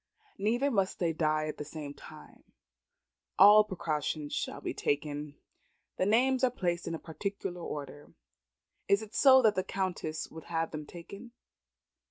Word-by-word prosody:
Neither 240 +8 +1
must 195 -5 0
they 170 -2 0
die 155 -1 +1
at 155 - -5
the - - -4
same 150 -1 -7
time. - - -14 0.9
All 205 +2 +9
precaution 155 -6 -3
shall - - -3
be - - -4
taken. 145 0 -2 0.6
The 185 - +1
names 255 +4 +3
are 255 - +5
placed 175 -7 -2
in 165 - -2
a - - -4
particular 180 +2 -5
order. 145 -2 -7 0.8
Is 200 +2 +3
it 215 - -12
so 265 -2 +6
the 210 -4 +3
Countess 180 -5 -3
would 160 - -10
have 165 -1 -2
them 150 -1 -6
taken? 200 +7 -11
175 Hz, 150 wpm, -31 LUFS, 155-210 Hz, 0.9 s, All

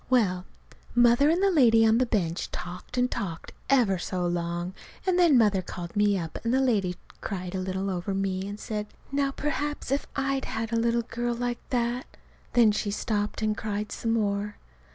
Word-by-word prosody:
Well, 190 -8 +2 0.5
Mother 240 +4 +5
and 345 +4 +2
the 395 - +4
lady 230 -8 +6
on 225 +1 +4
the 255 - +2
bench 175 -7 -1
talked 180 +7 -7
and 250 0 +2
talked 165 -4 -4 0.2
ever 235 -9 +4
so 180 0 -2
long, 175 +1 -2 0.3
and 365 -1 +2
then 335 -7 +6
Mother 210 -5 +4
called 175 -1 -7
me 205 -1 +3
up, 165 -3 -4
and 230 - 0
the 260 - +3
lady 205 -9 +1 0.3
cried 185 -2 -4
a 190 - -1
little 190 +1 -2
over 185 +2 -2
me, 195 0 -1
and 205 +1 -6
said, 210 -1 -4 0.2
"Now, 280 0 +1
perhaps, 290 0 -3
if 275 - 0
I'd 275 -1 0
had 225 +1 -3
a 230 - +3
little 235 0 +2
girl 240 +1 -2
like 245 0 -2
that 245 0 0 0.2
!" - - -31
Then 235 -3 +6
she 210 0 -1
stopped 210 +1 -2
and 215 0 +1
cried 210 -1 -3
some 225 -1 -1
more. 205 -1 0
220 Hz, 195 wpm, -27 LUFS, 190-245 Hz, 0.5 s, lady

